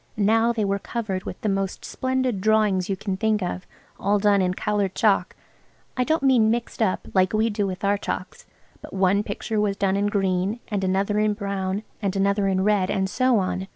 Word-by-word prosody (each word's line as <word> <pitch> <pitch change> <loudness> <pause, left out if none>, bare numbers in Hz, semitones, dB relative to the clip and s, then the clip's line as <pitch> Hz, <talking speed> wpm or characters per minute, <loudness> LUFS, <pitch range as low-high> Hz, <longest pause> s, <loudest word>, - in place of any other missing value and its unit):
Now 225 +3 +3
they 225 -3 -1
were 200 0 0
covered 200 -4 -4
with - - -6
the - - -2
most 195 -1 -2
splendid 260 -5 -1
drawings 210 -3 +2
you 195 - -1
can 190 0 -3
think 215 -1 +1
of, 180 +1 -4 0.3
all 205 +1 +2
done 205 -1 +3
in 180 0 0
coloured 205 -2 -1
chalk–I 215 +4 -2
don't 315 +2 0
mean 250 -5 +4
mixed 235 +1 -2
up, 200 -4 0
like 185 0 +3
we 220 +1 +2
do 205 -1 -1
with 185 +1 -6
our 200 0 +2
chalks–but - - -8
one 195 +1 +2
picture 210 +1 -3
was 200 -1 0
done 195 -1 +1
in 200 +1 +1
green, 195 +1 0
and 205 -3 -2
another 195 +2 +1
in 215 -1 +1
brown, 200 -1 -3 0.2
and 200 -2 -1
another 200 +1 +1
in 190 -1 +1
red, 200 -2 +2
and 190 -1 0
so 255 +4 +2
on. 190 -1 -2
200 Hz, 195 wpm, -24 LUFS, 190-215 Hz, 0.3 s, mean